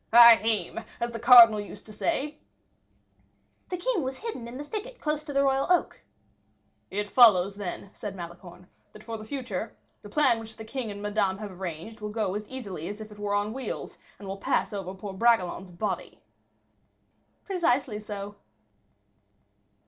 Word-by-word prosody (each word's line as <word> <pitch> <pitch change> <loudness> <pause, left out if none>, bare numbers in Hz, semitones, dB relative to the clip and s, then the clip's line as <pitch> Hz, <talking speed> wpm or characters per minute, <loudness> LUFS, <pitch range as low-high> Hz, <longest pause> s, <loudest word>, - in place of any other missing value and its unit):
"Ahime! 225 -1 +6 0.2
as 235 0 -1
the 230 - -5
cardinal 235 -2 +9
used 205 0 -8
to 215 - -10
say." 300 +4 -2 1.3
"The 360 - -2
king 390 +1 0
was 265 -1 -3
hidden 425 - -6
in 240 +2 -8
the 290 - -5
thicket 450 +9 -6
close 300 0 -1
to 295 - -5
the 275 0 +2
royal 270 0 +2
oak." 360 - +1 0.9
"It 205 +2 -2
follows, 200 -5 +6
then," 200 0 -6
said 205 -2 -6
Malicorne, 175 0 -10 0.3
"that 215 - -13
for 225 -1 -6
the - - -8
future, 225 -4 -5 0.2
the 205 - -11
plan 265 -3 +3
which 220 -1 -9
the 220 - -8
king 240 0 -4
and 205 0 -7
Madame 205 -2 0
have 210 -1 -7
arranged, 185 +4 -7
will 210 - -4
go 210 -3 -1
as 210 +1 -5
easily 200 -11 -6
as 205 +1 -7
if 215 0 -9
it 210 - -13
were 205 0 -1
on 205 +1 0
wheels, 265 0 -6 0.2
and 200 - -10
will 195 +1 -4
pass 195 - 0
over 195 -2 -5
poor 195 +1 -7
Bragelonne's 190 -3 +2
body." 180 +5 -4 1.2
"Precisely 275 - 0
so." 205 -1 -7
215 Hz, 170 wpm, -27 LUFS, 200-255 Hz, 1.3 s, cardinal